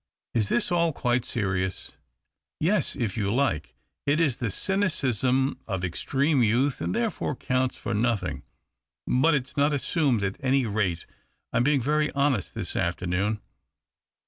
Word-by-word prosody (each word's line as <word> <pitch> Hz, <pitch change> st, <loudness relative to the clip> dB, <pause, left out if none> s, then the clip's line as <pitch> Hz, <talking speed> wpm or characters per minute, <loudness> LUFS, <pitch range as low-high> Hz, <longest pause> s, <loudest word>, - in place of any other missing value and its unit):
" -, -, -66 dB
Is 110 Hz, -4 st, +1 dB
this 120 Hz, -, +1 dB
all 170 Hz, -2 st, +2 dB
quite 125 Hz, -2 st, +1 dB
serious? 95 Hz, -4 st, -2 dB, 0.2 s
" -, -, -56 dB
" -, -, -64 dB
Yes. 210 Hz, 0 st, +1 dB
If 115 Hz, -5 st, -2 dB
you 100 Hz, -2 st, 0 dB
like, 110 Hz, -, 0 dB, 0.3 s
it 145 Hz, +3 st, +3 dB
is 145 Hz, -8 st, +2 dB
the 120 Hz, -4 st, -2 dB
cynicism 135 Hz, -, +1 dB
of 95 Hz, -4 st, -2 dB
extreme 135 Hz, -, +1 dB
youth, 125 Hz, +5 st, +2 dB
and -, -, -1 dB
therefore 225 Hz, -, -1 dB
counts 130 Hz, 0 st, -1 dB
for 120 Hz, -, -3 dB
nothing. 115 Hz, 0 st, 0 dB, 0.6 s
But 150 Hz, +5 st, +3 dB
it's 130 Hz, -2 st, -3 dB
not 145 Hz, +1 st, +3 dB
assumed, 140 Hz, -, +1 dB
at 95 Hz, 0 st, -2 dB
any 135 Hz, -1 st, +2 dB
rate. 100 Hz, -6 st, -1 dB, 0.5 s
I'm 115 Hz, -, +3 dB
being 140 Hz, -2 st, +2 dB
very 150 Hz, +3 st, +2 dB
honest 140 Hz, -7 st, 0 dB
this -, -, -4 dB
afternoon." 90 Hz, +5 st, -1 dB
125 Hz, 155 wpm, -26 LUFS, 105-145 Hz, 0.6 s, it